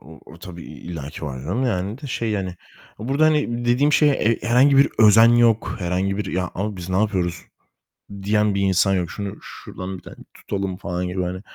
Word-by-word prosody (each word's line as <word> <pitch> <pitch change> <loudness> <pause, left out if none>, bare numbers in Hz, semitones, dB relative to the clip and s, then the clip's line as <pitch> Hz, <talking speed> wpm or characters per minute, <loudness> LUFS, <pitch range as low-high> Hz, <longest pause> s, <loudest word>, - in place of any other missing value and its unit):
O 80 +4 -14
o 80 - -13
tabii 85 -1 -10
illaki 80 -3 -8
var 65 -3 -5
canım 95 - -2
yani 100 0 -2
de - - -5
şey 115 -3 -2
yani, 95 -4 -2 0.4
burada 135 +8 +1
hani 145 -6 +1
dediğim 130 +5 +2
şey, 150 -1 +5
e 115 -4 +1
herhangi 125 +5 +4
bir 140 - +6
özen 110 +1 +7
yok, 115 -2 +3
herhangi 95 +2 -1
bir 105 -2 -4
"Ya, 90 -1 -2
ama 100 +2 -3
biz 90 -1 -7
ne 95 - 0
yapıyoruz?" 95 -5 -1 0.8
diyen 105 0 +1
bir 100 - 0
insan 95 0 +2
yok. 90 -3 -1
"Şunu 100 -1 -6
şuradan 95 +1 -8
bir - - -16
tane - - -11 0.2
tutalım." 95 -2 -4
falan 90 -2 -4
gibi 90 +1 -2
hani, 90 +1 -4
100 Hz, 200 wpm, -22 LUFS, 90-115 Hz, 0.8 s, özen